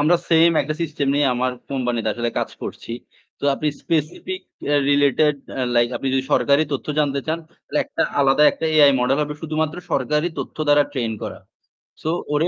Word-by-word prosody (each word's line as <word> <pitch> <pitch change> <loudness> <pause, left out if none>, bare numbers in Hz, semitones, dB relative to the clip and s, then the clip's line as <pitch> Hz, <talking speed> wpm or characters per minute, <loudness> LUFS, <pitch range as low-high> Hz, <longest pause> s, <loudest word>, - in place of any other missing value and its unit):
আমরা 160 +4 +4
সেম 165 0 +6
একটা 155 +2 -3
সিস্টেম 150 -3 -2
নিয়ে 145 0 +3
আমার 130 +1 0 0.2
কোম্পানিতে 120 -4 -1
আসলে 120 0 -2
কাজ - - -2
করছি। 115 - -6 0.5
তো - - -7
আপনি 150 - -1
স্পেসিফিক 165 - -2 0.5
রিলেটেড 145 +1 +3 0.4
লাইক 120 0 +4
আপনি 135 - -3
যদি 130 0 +1
সরকারি 140 +4 +4
তথ্য 140 - -3
জানতে 140 -2 +1
চান 160 +1 -1
তাহলে - - -5
একটা - - -2 0.2
আলাদা 140 +2 +4
একটা 160 - -3
এআই 145 -2 +8
মডেল 130 +3 +2
হবে 150 0 -4
শুধুমাত্র 155 0 -1 0.2
সরকারি 150 +5 +1
তথ্য - - -6
দ্বারা 145 0 +6
ট্রেন 120 -5 -2
করা। - - -5 0.6
সো 155 - -2 0.2
ওরে 150 +3 +2
145 Hz, 175 wpm, -21 LUFS, 135-155 Hz, 0.6 s, এআই